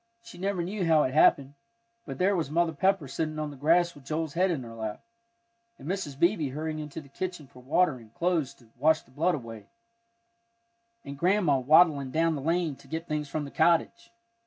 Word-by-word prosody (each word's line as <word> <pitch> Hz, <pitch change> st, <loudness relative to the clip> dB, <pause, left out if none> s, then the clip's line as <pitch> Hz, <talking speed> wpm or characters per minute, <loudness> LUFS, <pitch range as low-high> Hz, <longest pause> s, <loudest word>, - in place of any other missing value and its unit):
She 230 Hz, -, -13 dB
never 190 Hz, -2 st, -1 dB
knew 195 Hz, +2 st, -3 dB
how 160 Hz, -3 st, +4 dB
it 130 Hz, -, -2 dB
happened, 140 Hz, -2 st, +4 dB, 0.5 s
but 135 Hz, -2 st, -6 dB
there 195 Hz, +4 st, +2 dB
was 165 Hz, -6 st, -2 dB
Mother 165 Hz, +1 st, +1 dB
Pepper 190 Hz, -1 st, +1 dB
sitting 155 Hz, +3 st, -3 dB
on 155 Hz, -1 st, -3 dB
the -, -, -10 dB
grass 170 Hz, +5 st, +2 dB
with 145 Hz, -, -16 dB
Joel's 155 Hz, +1 st, -3 dB
head 185 Hz, +3 st, +2 dB
in 155 Hz, -7 st, -2 dB
her 115 Hz, -1 st, -10 dB
lap, 110 Hz, -2 st, -6 dB, 0.7 s
and -, -, -11 dB
Mrs. 175 Hz, -7 st, -3 dB
Beebe 170 Hz, -3 st, +2 dB
hurrying 155 Hz, +3 st, -4 dB
into 150 Hz, +1 st, -7 dB
the 140 Hz, -, -16 dB
kitchen 175 Hz, +2 st, -5 dB
for 130 Hz, -, -17 dB
water 150 Hz, +2 st, +2 dB
and 115 Hz, -3 st, -16 dB
cloths 170 Hz, -6 st, 0 dB
to 115 Hz, -3 st, -23 dB
wash 155 Hz, +3 st, +3 dB
the 125 Hz, -, -25 dB
blood 165 Hz, +7 st, +1 dB
away, 115 Hz, -6 st, -9 dB, 1.4 s
and 140 Hz, 0 st, -8 dB
Grandma 175 Hz, -6 st, +2 dB
waddling 145 Hz, 0 st, +4 dB
down 165 Hz, +4 st, +1 dB
the 145 Hz, -, -4 dB
lane 165 Hz, 0 st, 0 dB
to -, -, -18 dB
get 165 Hz, +1 st, -5 dB
things 150 Hz, -1 st, -3 dB
from 150 Hz, +1 st, -3 dB
the 140 Hz, -, -9 dB
cottage. 170 Hz, +7 st, +1 dB
155 Hz, 205 wpm, -28 LUFS, 140-175 Hz, 1.4 s, how